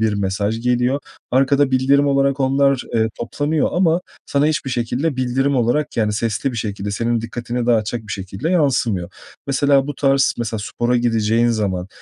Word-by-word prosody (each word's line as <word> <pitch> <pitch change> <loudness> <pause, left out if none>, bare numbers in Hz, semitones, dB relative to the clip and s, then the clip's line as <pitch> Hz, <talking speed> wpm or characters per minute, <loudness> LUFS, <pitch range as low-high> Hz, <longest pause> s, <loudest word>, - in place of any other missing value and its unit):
bir 110 -1 +2
mesaj 100 +2 -1
geliyor. 125 +3 +1 0.3
Arkada 135 +2 +3
bildirim 135 +2 +3
olarak 140 0 +1
onlar, 135 0 +2
eee, 110 -1 +2
toplanıyor 145 +6 -1
ama 175 -1 +2 0.3
sana 140 +1 +1
hiçbir 155 -3 -1
şekilde 130 +5 -1
bildirim 130 +2 0
olarak 125 +5 0
yani 105 -2 +1
sesli 115 +5 -1
bir 120 - -6
şekilde, 105 -2 -3
senin 115 +3 0
dikkatini 120 +1 -4
dağıtacak 115 -1 +1
bir 110 0 -7
şekilde 95 - -4
yansımıyor. 120 - +1 0.4
Mesela 140 0 +2
bu 145 - -4
tarz 135 0 +2
mesela 110 -2 -2
spora 120 +4 -1
gideceğin 115 -1 +2
zaman 100 -5 -1
125 Hz, 160 wpm, -19 LUFS, 110-140 Hz, 0.4 s, Arkada